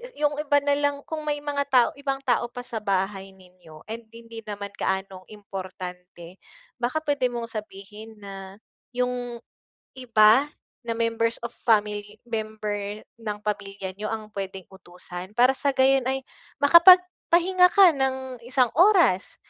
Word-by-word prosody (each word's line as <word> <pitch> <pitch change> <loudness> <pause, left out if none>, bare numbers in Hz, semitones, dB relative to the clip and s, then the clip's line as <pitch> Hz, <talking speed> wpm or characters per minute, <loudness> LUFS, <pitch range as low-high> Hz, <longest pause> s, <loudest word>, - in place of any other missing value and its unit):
'yu 300 - -7
'yung 295 0 +1
iba 290 -1 +2
na 285 0 +2
lang 285 0 +1
kung 310 -1 -6
may 290 -1 -2
mga 285 -1 -1
tao 255 -3 +4
ibang 275 -1 -3
tao 245 -3 +1
pa 245 +1 -9
sa 230 -2 -5
bahay 195 -1 -2
ninyo 180 -4 -17
and 225 +1 -8
hindi 230 0 -10
naman 200 -1 -6
gaanong 190 -1 -3
importante, 185 -3 -9 0.4
baka 250 +6 -1
pwede 285 -4 +1
mong 235 -2 -6
sabihin 215 +1 -9
na 195 -1 -10 0.4
'yung 245 -1 -3 0.5
iba 245 +2 +4 0.3
na 235 - -4
members 230 0 0
of - - -20
family 210 -2 0
member 215 -2 -4 0.2
ng 210 -2 -4
pamilya 195 -2 -4
niyo 210 +2 -5
ang 220 -1 -5
pwedeng 195 -1 -5
utusan 180 0 -10
para 250 +2 +5
sa 275 +1 -1
gayon 265 -1 +3
ay 265 0 -1 0.4
makapagpahinga 360 +2 +6
ka 385 -3 +8
ng 265 -3 -3
isang 250 -1 +2
oras, 350 - +4
230 Hz, 145 wpm, -25 LUFS, 200-265 Hz, 0.5 s, ka